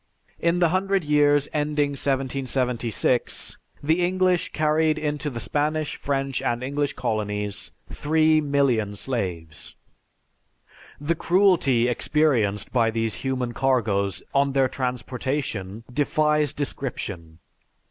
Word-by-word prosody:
In 170 +1 +1
the 175 -2 +3
hundred 190 +1 +1
years 145 -1 +3
ending 150 -1 +1
1776, 130 -3 -1 0.3
the 160 +4 +2
English 185 0 +1
carried 155 0 +2
into 150 -1 -2
the 120 -4 -6
Spanish, 150 +8 -1
French, 135 -2 -2
and 120 +1 -1
English 140 +2 -1
Colonies 105 -5 -2 0.2
three 155 +1 +2
million 135 -8 +1
slaves. 90 - -4 1.2
The 145 +4 0
cruelty 170 -9 +3
experienced 120 -6 +1
by 115 -3 +3
these 115 -1 -1
human 130 -2 -2
cargoes 105 -8 0
on 140 0 +2
their 135 -1 +3
transportation 125 -5 -3
defies 150 +1 +2
description. 105 - -5
135 Hz, 105 wpm, -24 LUFS, 115-150 Hz, 1.2 s, the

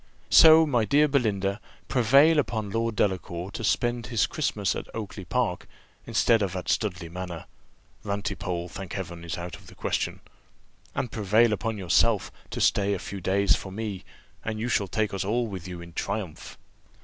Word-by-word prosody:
So, 160 0 +9
my 125 -7 +2
dear 145 +8 +4
Belinda, 105 -7 0 0.3
prevail 140 +6 +5
upon 110 -7 -2
Lord 115 0 -1
Delacour 90 -2 -1
to 115 - -6
spend 120 +4 0
his 115 -2 +2
Christmas 105 - -1
at - - -5
Oakly 105 -3 -6
park, 115 -3 -1 0.4
instead 115 0 +3
of 95 -2 -1
at 90 - -4
Studley 90 -5 -1
manor 90 -1 -6 0.6
(Rantipole, 95 -3 -3
thank 95 +1 -8
Heaven! 85 -3 -6
is 85 - -4
out 85 0 -6
of - - -16
the - - -14
question), - - -2 0.7
and 120 - -2
prevail 110 +2 +3
upon 110 0 -2
yourself 100 +3 +2 0.2
to - - -5
stay 100 0 +2
a - - -2
few 95 +2 -7
days 95 +1 +3
for 95 - -7
me, 100 -2 -5 0.4
and 110 -1 -3
you 120 +2 -2
shall 100 -4 +1
take 110 +2 -1
us 95 - -1
all 115 +5 0
with 95 -5 -6
you 90 -1 -7
in 85 0 -11
triumph." 95 -3 -4
100 Hz, 175 wpm, -26 LUFS, 90-115 Hz, 0.7 s, So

